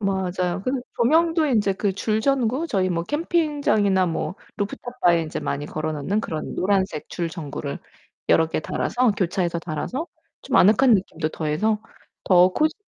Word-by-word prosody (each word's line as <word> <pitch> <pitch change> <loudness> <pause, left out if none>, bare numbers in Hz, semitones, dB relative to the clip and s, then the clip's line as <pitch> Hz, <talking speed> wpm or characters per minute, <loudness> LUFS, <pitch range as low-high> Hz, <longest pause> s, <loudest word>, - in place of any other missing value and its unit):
맞아요. 185 -2 -1
그 255 - -1 0.3
조명도 325 +5 +3
인제 210 -7 +2
그 195 +1 -1
줄 215 +2 0
전구 265 +3 +1
저희 185 - 0
뭐 170 -1 -1
캠핑장이나 290 - +1
뭐 170 +2 -2 0.2
루프탑 245 +5 -5
바에 170 -2 +3 0.2
많이 145 +1 -2
걸어 155 +1 -3
놓는 185 +9 -1
그런 155 -7 -5
노란색 190 -5 0
줄 170 -2 -3
전구를 145 -4 -5 0.5
여러 160 - +5
개 160 - -2
달아서 245 +7 0
교차해서 180 -2 -1
달아서 175 - -4 0.4
좀 - - 0
아늑한 225 +6 +6
느낌도 170 -5 -1
더해서 180 +9 -1 0.4
더 180 -1 +6
코지 310 - +1
195 Hz, 315 characters per minute, -23 LUFS, 170-245 Hz, 0.5 s, 아늑한